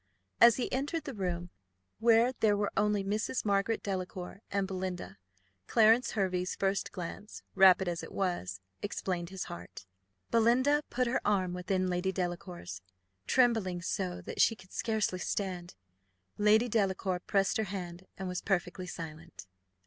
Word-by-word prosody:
As 235 -1 +8
he 255 - -2
entered 290 +5 -1
the 280 -3 -6
room, 175 -4 -3 0.5
where 230 +2 +5
there 210 -2 +3
were 205 0 0
only 210 -1 +2
Mrs. 215 +5 -1
Margaret 200 +2 +1
Delacour 185 0 -4
and 200 -1 0
Belinda, 185 -2 -5 0.5
Clarence 225 +2 +4
Hervey's 185 -3 0
first 195 0 0
glance, 185 +4 -7
rapid 190 -1 +6
as 175 -1 -2
it - - -9
was, 95 - -2 0.2
explained 180 -4 -3
his 190 -1 -5
heart. 85 +2 -9 0.5
Belinda 250 +6 +4
put 250 +1 0
her 245 +2 0
arm 190 -3 +1
within 185 +1 -1
Lady 180 +1 0
Delacour's, 175 - -4 0.5
trembling 225 -8 +3
so 180 -1 -2
that - - -2
she 225 - +5
could 185 -3 -17
scarcely 220 -5 0
stand. 180 -3 -3 0.6
Lady 215 +3 +4
Delacour 195 -4 0
pressed 195 +1 +1
her 220 - 0
hand, 185 -2 -6
and 190 - -4
was 180 -1 -3
perfectly 185 -1 -1
silent. 165 - -8
190 Hz, 145 wpm, -31 LUFS, 180-215 Hz, 0.6 s, As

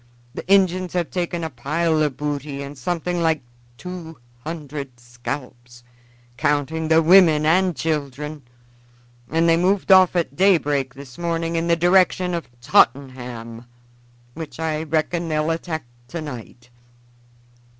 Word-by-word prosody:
The - - -8
Injuns 185 -2 +3
have 175 -2 -1
taken 175 -2 -2
a 160 - -4
pile 155 +6 0
of 145 -4 0
booty 145 -1 -4
and 140 +1 -8
something 175 +5 -2
like 160 -4 +1 0.3
two 175 -2 -8 0.3
hundred 145 -5 -7
scalps, 120 0 -8 0.5
counting 150 +2 0
the 160 +1 +4
women 165 -3 +6
and 180 +2 +3
children, 150 0 -3 0.9
and 165 +2 +2
they 165 0 +5
moved 190 +3 +1
off 185 -1 +7
at 160 -6 -1
daybreak 145 -8 +2
this 135 -1 -12
morning 165 -1 -1
in 165 +1 0
the 170 - +4
direction 180 +1 +3
of 170 -1 -4
Tottenham, 120 -3 0 0.7
which 150 -4 -8
I 155 -1 -1
reckon 160 +2 -1
they'll 155 +1 0
attack 165 -2 -3 0.2
tonight. 125 -6 -8
160 Hz, 130 wpm, -22 LUFS, 140-170 Hz, 0.9 s, off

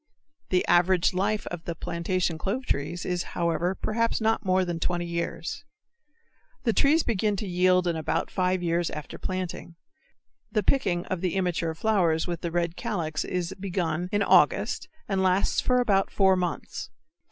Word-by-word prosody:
The 180 -1 +2
average 175 +1 +4
life 205 +3 0
of 175 -1 -6
the 170 - -3
plantation 170 0 -2
clove 235 +10 -2
trees 150 - -2
is, 180 -1 -1 0.2
however, 175 +2 0
perhaps 230 +3 0
not 225 0 +1
more 185 -1 +2
than 170 -2 -3
20 175 0 -1
years. 170 +9 -4 1.0
The 230 - +2
trees 300 +6 +4
begin 210 -2 0
to 200 +1 -4
yield 180 0 +3
in 170 -1 0
about 160 -2 -1
five 185 -1 0
years 170 0 +1
after 150 - -7
planting. 185 -2 -4 0.8
The 215 -2 +1
picking 185 -8 +1
of 185 -2 -3
the 185 -2 -1
immature 175 -3 0
flowers 170 -5 +2
with 175 -2 -4
the 170 - -2
red 170 0 -1
calyx 170 -10 -2
is 180 -2 -3
begun 180 -3 -2
in 205 -1 +2
August - - +3 0.2
and 195 -2 0
lasts 185 +1 +2
for 250 0 +2
about 200 -5 +2
four 190 -1 +4
months. 180 -2 -3
180 Hz, 165 wpm, -27 LUFS, 170-195 Hz, 1.0 s, average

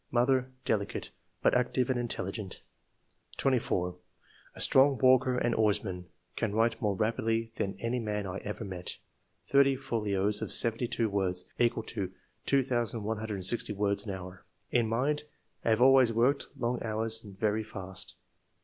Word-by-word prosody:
Mother 130 +1 +2
— 130 - -37
Delicate, 100 -2 -1 0.3
but - - +4
active 125 0 +2
and 125 - 0
intelligent." 100 -4 -4 0.7
24. 90 -9 0 0.3
" - - -28
A - - -10
strong 135 0 +5
walker 130 0 +4
and 120 -1 +1
oarsman; 100 -5 0 0.3
can 105 -2 -1
write 115 0 +2
more 105 -2 +1
rapidly 115 +1 0
than 100 - -2
any 115 +2 -1
man 105 -2 -2
I 95 +1 -4
ever 105 +2 -5
met 90 -3 -5 0.5
(thirty 140 -1 +4
folios 105 -6 0
of - - -3
seventy 115 +1 +1
two 115 -1 0
words, 95 -3 0
equal 120 -1 +2
to 100 -5 -4 0.4
2160 110 -5 0
words 100 +1 0
an 100 - -2
hour.) 90 -1 -9 0.3
In 120 -2 +3
mind 140 +6 0 0.2
— - - -43
Have 115 +1 +3
always 130 -2 +6
worked 125 +5 +2
long 120 0 -1
hours 110 0 -2
and 100 -3 -12
very 110 +1 +1
fast. 95 -3 -7
110 Hz, 150 wpm, -30 LUFS, 100-125 Hz, 0.7 s, always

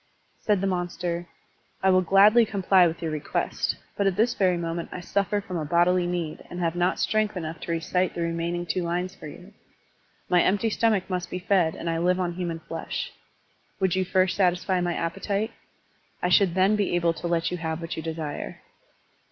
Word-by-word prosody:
*' - - -41
Said 205 -3 +2
the - - 0
monster: 175 -2 -2 0.6
I 190 - +5
will 185 0 +5
gladly 200 +6 +6
comply 195 -3 +4
with 165 +1 -5
your 160 - -1
request, 155 0 -1 0.2
but 200 - +1
at 190 - +1
this 225 +4 +2
very 185 -3 +2
moment 170 0 -3
I - - -5
suffer 200 +3 0
from 185 -3 -5
a 160 - -2
bodily 175 +3 +3
need 175 -3 -3
and 175 - -6
have 170 -1 0
not 175 +1 +1
strength 215 -2 0
enough 160 -2 -5
to - - -5
recite 180 +2 0
the 170 - -1
remaining 170 +1 -2
two 185 - -1
lines 175 +2 -2
for - - -10
you. 180 +7 -12 0.7
My 180 -1 +4
empty 205 +3 +2
stomach 215 -4 +1
must 180 -2 -3
be - - -3
fed 180 -3 +2
and - - -6
I 165 0 0
live 180 +2 +2
on 175 -1 -1
human 170 -2 -4
flesh. 165 0 -5 0.7
Would 190 -2 +1
you 190 - +2
first 185 0 +2
satisfy 180 -1 +1
my 175 -1 -1
appetite? 200 +6 -2 0.7
I 180 - +2
should 180 -1 +4
then 190 +3 +4
be 205 -4 0
able 170 -1 +2
to 170 - -5
let 170 0 0
you 180 - -2
have 160 -1 -3
what 165 -1 -5
you - - -4
desire." 160 -2 -5
180 Hz, 200 wpm, -26 LUFS, 170-190 Hz, 0.7 s, gladly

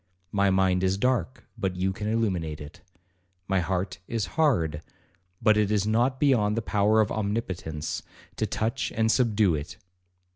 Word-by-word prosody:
My 100 -1 +2
mind 95 -1 +2
is 95 +1 +2
dark, 125 0 -1
but 95 -4 -1
you 95 +1 0
can 105 +2 -5
illuminate 95 -9 -1
it. 75 0 -11 0.7
My 95 -1 +2
heart 95 +1 -2
is 115 -3 -1
hard, 85 - +1 0.6
but 110 -1 +5
it 105 -2 +2
is 105 -2 +1
not 120 +5 +1
beyond 115 -7 +3
the 115 - -1
power 105 +1 +3
of 105 - 0
omnipotence 95 -8 -3 0.4
to - - 0
touch 115 +5 -2
and 110 0 +2
subdue 110 -7 +3
it. 75 +3 -5
105 Hz, 155 wpm, -27 LUFS, 95-110 Hz, 0.7 s, but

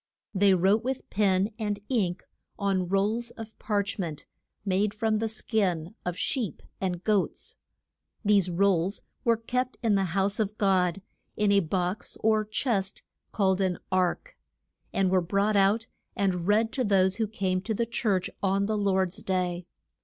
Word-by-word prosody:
They 195 -1 +4
wrote 195 +5 +3
with 260 +1 -3
pen 195 0 +2
and 210 -2 -2
ink 190 -8 0 0.3
on 195 -3 0
rolls 210 +5 +1
of 225 -2 -10
parch 205 -1 -1
ment, 155 -5 -4 0.4
made 200 +2 +1
from 215 0 +1
the 225 - 0
skin 195 -6 -1
of 180 0 -3
sheep 245 -3 -2 0.2
and 180 -2 -2
goats. 210 -3 -1 0.7
These 200 -3 +4
rolls 190 +1 +1 0.2
were 230 -1 +3
kept 250 +3 -2
in 225 -2 +3
the 195 -1 +2
house 195 +2 +1
of 210 0 -1
God, 190 -2 +2 0.3
in 210 -1 +3
a 200 - +5
box 180 +3 -2
or 220 0 +3
chest 210 -2 -1 0.3
called 190 -2 +2
an 185 -2 +1
ark, 185 - 0 0.6
and 190 -1 +1
were 185 -1 +4
brought 200 +4 +1
out 200 +3 +3 0.3
and 185 -3 0
read 220 +2 +3
to 255 - -1
those 195 -2 +3
who 220 - 0
came 190 -3 -1
to 220 +3 -2
the 235 - 0
church 210 -5 0
on 195 0 +2
the 215 0 -1
Lord's 190 0 0
day. 180 -2 -1
200 Hz, 160 wpm, -27 LUFS, 185-215 Hz, 0.7 s, a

